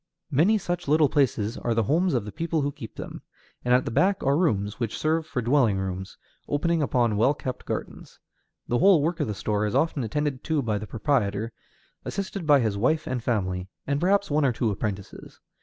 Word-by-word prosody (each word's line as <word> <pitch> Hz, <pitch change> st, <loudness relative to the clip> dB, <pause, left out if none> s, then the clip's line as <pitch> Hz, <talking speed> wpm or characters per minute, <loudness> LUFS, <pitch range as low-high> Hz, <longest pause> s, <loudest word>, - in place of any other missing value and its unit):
Many 170 Hz, +11 st, +4 dB
such 175 Hz, -3 st, -3 dB
little 150 Hz, 0 st, +4 dB
places 120 Hz, -6 st, +1 dB
are 120 Hz, -1 st, -1 dB
the 115 Hz, -, +2 dB
homes 165 Hz, -, +2 dB
of 115 Hz, -4 st, 0 dB
the 105 Hz, -, -6 dB
people 165 Hz, +2 st, -1 dB
who 145 Hz, +1 st, -1 dB
keep 115 Hz, -5 st, -10 dB
them. -, -, -7 dB, 0.4 s
And 125 Hz, -, 0 dB
at 125 Hz, +1 st, +4 dB
the -, -, -3 dB
back 190 Hz, -, +2 dB
are 135 Hz, +1 st, +3 dB
rooms, 105 Hz, -, 0 dB
which 115 Hz, -3 st, -2 dB
serve 160 Hz, +1 st, 0 dB
for 125 Hz, -6 st, -3 dB
dwelling 120 Hz, -5 st, +3 dB
rooms, 95 Hz, 0 st, -4 dB, 0.3 s
opening 165 Hz, +3 st, +1 dB
upon 120 Hz, -6 st, +1 dB
well 130 Hz, +7 st, +3 dB
kept 130 Hz, -3 st, -6 dB
gardens. -, -, -6 dB, 0.5 s
The 120 Hz, -, +1 dB
whole 190 Hz, -7 st, +5 dB
work 165 Hz, +2 st, -1 dB
of -, -, 0 dB
the 105 Hz, -, -3 dB
store 105 Hz, +1 st, -1 dB
is 105 Hz, -, -3 dB
often 155 Hz, -5 st, +1 dB
attended 140 Hz, +3 st, -2 dB
to 155 Hz, -4 st, 0 dB
by 105 Hz, -3 st, -1 dB
the 110 Hz, -, -7 dB
proprietor, 115 Hz, -3 st, 0 dB, 0.5 s
assisted 195 Hz, -3 st, -4 dB
by 145 Hz, -3 st, +6 dB
his 105 Hz, -3 st, -1 dB
wife 155 Hz, +8 st, +1 dB
and 125 Hz, -3 st, -3 dB
family, 95 Hz, -6 st, -1 dB, 0.2 s
and 140 Hz, +1 st, -1 dB
perhaps 200 Hz, 0 st, +2 dB
one 150 Hz, +1 st, +2 dB
or 135 Hz, -, +3 dB
two 115 Hz, -1 st, 0 dB
apprentices. 100 Hz, -1 st, -5 dB
130 Hz, 205 wpm, -26 LUFS, 110-155 Hz, 0.5 s, by